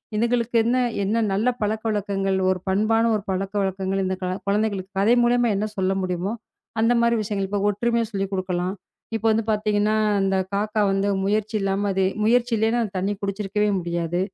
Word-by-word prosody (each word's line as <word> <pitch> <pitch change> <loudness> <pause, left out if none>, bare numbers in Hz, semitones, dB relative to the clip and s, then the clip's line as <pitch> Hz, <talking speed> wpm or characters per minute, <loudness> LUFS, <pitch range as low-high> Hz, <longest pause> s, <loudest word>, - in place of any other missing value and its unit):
இதுங்களுக்கு 235 +1 0
என்ன 240 +3 +1 0.3
என்ன 220 +4 +1
நல்ல 210 +5 +1
பழக்கவழக்கங்கள், 205 -3 -1
ஒரு 185 - +1
பண்பான 215 +4 +2
ஒரு 205 - -3
பழக்க 195 +1 -2
வழக்கங்கள் 195 0 -1
இந்தக் 185 0 -3
க - - 0 0.2
குழந்தைகளுக்குக் 200 -2 -1
கதை 215 +4 +4
மூலியமா 240 0 +3
என்ன 210 - 0
சொல்ல 190 0 +1
முடியுமோ 185 +2 -2 0.5
அந்த 230 +2 +4
மாரி 235 0 +3
விஷயங்கள் 200 -2 -2
இப்ப 205 - -1
ஒற்றுமையை 235 +3 0
சொல்லிக் 195 -1 -3
குடுக்கலாம். 185 0 -2 0.4
இப்ப 225 0 -3
வந்து 220 +1 +1
பாத்தீங்கன்னா 210 0 +1 0.2
அந்தக் 190 -1 +1
காக்கா 210 +2 0
வந்து 195 +1 +1 0.2
முயற்சி 215 +2 0
இல்லாம 195 +1 0
அது 190 0 +1 0.2
முயற்சி 240 +2 +3
இல்லைனா 225 +2 +1 0.2
தண்ணி 195 +2 0
குடிச்சு 200 +1 -3
இருக்கவே 210 +1 0
முடியாது. 170 0 -2
205 Hz, 165 wpm, -23 LUFS, 195-220 Hz, 0.5 s, கதை